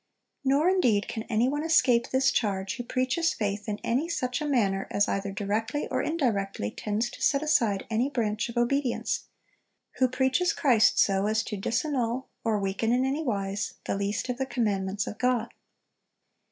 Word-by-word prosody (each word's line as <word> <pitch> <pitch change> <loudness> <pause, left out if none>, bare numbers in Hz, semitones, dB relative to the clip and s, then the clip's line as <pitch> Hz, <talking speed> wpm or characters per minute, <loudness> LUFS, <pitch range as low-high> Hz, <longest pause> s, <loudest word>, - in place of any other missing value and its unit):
Nor 280 +5 +3
indeed 245 - +3
can 220 - -4
any 230 +2 +2
one 290 +3 -1
escape 255 -7 +3
this 265 +1 +3
charge, 195 -4 -1
who 245 - -4
preaches 255 +7 0
faith 205 0 -2
in 205 - -2
any 270 +8 0
such 250 -6 -2
a 300 - -2
manner 200 -8 +1
as 200 - +2
either 200 0 -2
directly 215 +6 -2
or - - 0
indirectly 200 - -1
tends 215 +2 -2
to - - -11
set 280 +1 +2
aside 230 -10 +2
any 230 +4 0
branch 225 -4 -1
of 235 - -7
obedience: 250 +1 0 0.7
who 260 - +5
preaches 260 +7 +1
Christ 240 -7 +4
so 195 0 +3
as 220 +1 +1
to 210 - -5
disannul, 240 +3 -1
or 225 -2 +1
weaken 200 +3 -1
in 250 +2 +2
any 275 +4 -1
wise, 200 -6 -2
the - - -1
least 200 +3 -2
of 250 0 -3
the 265 - -1
commandments 200 -5 -1
of 215 - -7
God." 250 -2 +1
235 Hz, 175 wpm, -27 LUFS, 205-265 Hz, 0.7 s, who